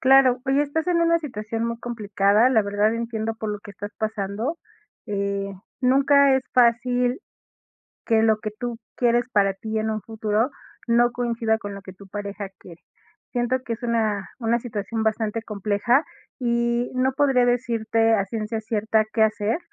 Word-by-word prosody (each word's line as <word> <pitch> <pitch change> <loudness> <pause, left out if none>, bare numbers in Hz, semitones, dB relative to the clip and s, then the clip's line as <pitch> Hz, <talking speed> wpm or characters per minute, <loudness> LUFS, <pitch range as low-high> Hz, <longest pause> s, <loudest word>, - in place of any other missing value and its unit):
Claro, 260 -1 +5
oye, 275 +2 +3
estás 315 +4 -2
en 345 -1 +2
una 335 0 +4
situación 225 -6 -4
muy 235 0 -3
complicada, 210 -1 +2
la 225 -5 +3
verdad 205 +2 +1
entiendo 225 -1 -3
por 220 -1 -4
lo 210 - -3
que 205 - -11
estás 205 +1 -7
pasando. 220 +8 -2 0.5
Eh, 200 -1 -2 0.3
nunca 275 +1 +5
es 265 - -1
fácil, 245 - +3 0.8
que 225 -2 +3
lo 220 -1 +3
que 215 -1 -4
tú 240 -1 -4 0.2
quieres 240 0 +3
para 195 -2 +3
ti 220 +2 -4
en 220 0 -1
un 215 - -2
futuro 220 +2 -1 0.4
no 240 +1 +4
coincida 235 -2 0
con 205 -2 -7
lo 200 - -9
que 190 - -10
tu 195 +1 -15
pareja 200 0 -5
quiere. 170 -1 -14 0.5
Siento 245 +1 +1
que 235 - -3
es 230 - -14
una 220 -5 0
una 235 -1 +1
situación 220 -1 -4
bastante 220 0 -1
compleja, 210 +6 +1 0.3
y 235 -1 0
no 260 +1 +2
podría 265 -3 +3
decirte 230 -2 +2
a 200 -2 +2
ciencia 220 +1 -3
cierta 220 0 +1
qué 220 - +2
hacer, 215 +6 0
225 Hz, 165 wpm, -24 LUFS, 210-245 Hz, 0.8 s, Claro